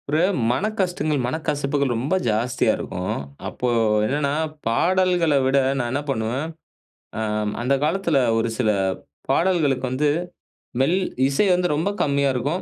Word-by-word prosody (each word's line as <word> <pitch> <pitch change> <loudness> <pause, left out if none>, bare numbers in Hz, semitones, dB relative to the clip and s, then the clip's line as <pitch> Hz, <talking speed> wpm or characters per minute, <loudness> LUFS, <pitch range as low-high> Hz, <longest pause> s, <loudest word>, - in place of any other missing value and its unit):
ஒரு 155 +2 +2 0.3
மனக்கஷ்டங்கள், 180 - -1
மனக்கசப்புகள் 140 -1 -1
ரொம்ப 135 +10 0
ஜாஸ்தியா 115 +3 +1
இருக்கும். 90 +1 -4 0.3
அப்போ 125 - -3 0.4
என்னன்னா 140 +4 0 0.4
பாடல்கள்ல 175 +4 +2
விட 135 +1 +2 0.2
நான் 120 -2 -2
என்ன 140 +2 -1
பண்ணுவேன், 125 +3 -1 0.8
அம். 105 -1 -1
அந்த 130 +3 +2
காலத்தில 165 -2 +1 0.2
ஒரு 115 +1 0
சில 115 -4 +2 0.6
பாடல்களுக்கு 150 -5 +2
வந்து 140 +4 +1 0.7
மெல் 165 +7 +3 0.3
இசை 140 +9 +2
வந்து 180 0 +2
ரொம்ப 160 +6 0
கம்மியா 140 -1 +1
இருக்கும். 145 +9 -1
140 Hz, 125 wpm, -22 LUFS, 125-165 Hz, 0.8 s, மெல்